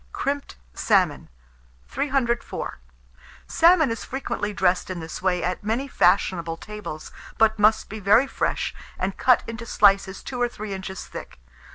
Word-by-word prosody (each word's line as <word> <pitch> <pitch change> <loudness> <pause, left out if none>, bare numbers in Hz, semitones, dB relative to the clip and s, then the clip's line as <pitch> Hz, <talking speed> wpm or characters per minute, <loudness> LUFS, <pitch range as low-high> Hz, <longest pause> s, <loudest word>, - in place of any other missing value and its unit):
CRIMPED 280 0 -3 0.2
SALMON. - - +1 0.6
304. 260 - -2 0.7
Salmon 330 -5 +4
is 225 - -4
frequently 255 -5 -3
dressed 185 -3 +1
in 185 -2 -4
this 160 0 -7
way 180 -1 +1
at 180 +2 -2
many 230 +6 -1
fashionable 170 - +2
tables, 170 -6 -8 0.3
but 220 -1 +3
must 220 +1 +4
be 220 - -7
very 210 +6 +5
fresh, - - -2 0.2
and 190 +1 -2
cut 250 -2 +4
into 230 0 -6
slices 195 -2 +3
2 250 -2 -5
or 245 - +2
3 215 -3 -6
inches 190 0 -6
thick. - - -9
210 Hz, 145 wpm, -24 LUFS, 190-240 Hz, 0.7 s, very